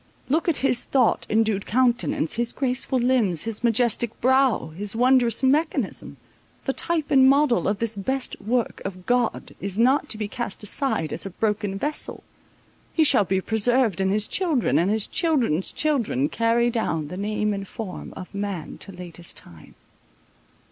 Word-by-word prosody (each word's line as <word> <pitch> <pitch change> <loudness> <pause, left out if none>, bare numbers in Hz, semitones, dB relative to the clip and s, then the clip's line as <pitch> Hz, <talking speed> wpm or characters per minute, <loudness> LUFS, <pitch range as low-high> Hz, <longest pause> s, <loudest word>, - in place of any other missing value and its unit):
Look 320 +5 +1
at 320 - +2
his 245 - +3
thought 255 -5 +1
endued 215 -2 +1
countenance, 240 -8 +1
his 235 +1 -1
graceful 260 0 0
limbs, 240 -10 +2
his 225 0 -4
majestic 235 -1 +1
brow, 260 -8 +2
his 195 +6 -3
wondrous 245 -1 +3
mechanism—the 285 -1 -2
type 325 -2 -1
and 265 -2 +6
model 275 -3 +3
of 200 - 0
this 225 0 -1
best 260 +6 -3
work 235 +1 -1
of 185 -2 -7
God 245 -2 0
is 195 0 -3
not 265 +6 +3
to 215 - -1
be 210 -1 -3
cast 220 -2 -5
aside 210 - -1
as - - -3
a - - -5
broken 205 0 -2
vessel—he 300 - -4
shall 210 -8 +4
be 190 0 0
preserved, 220 -1 +2
and 190 0 +1
his 210 +1 0
children 330 -10 +1
and 175 +3 +1
his 215 0 +2
children's 250 - 0
children 235 - 0
carry 230 +1 +1
down 165 -10 -2
the 180 - -6
name 210 +2 -1
and 195 -1 -5
form 195 -4 -7
of 185 - -9
man 200 -5 -5
to 195 - -4
latest 175 -2 -9
time. 80 -3 -9
225 Hz, 160 wpm, -24 LUFS, 195-260 Hz, -, and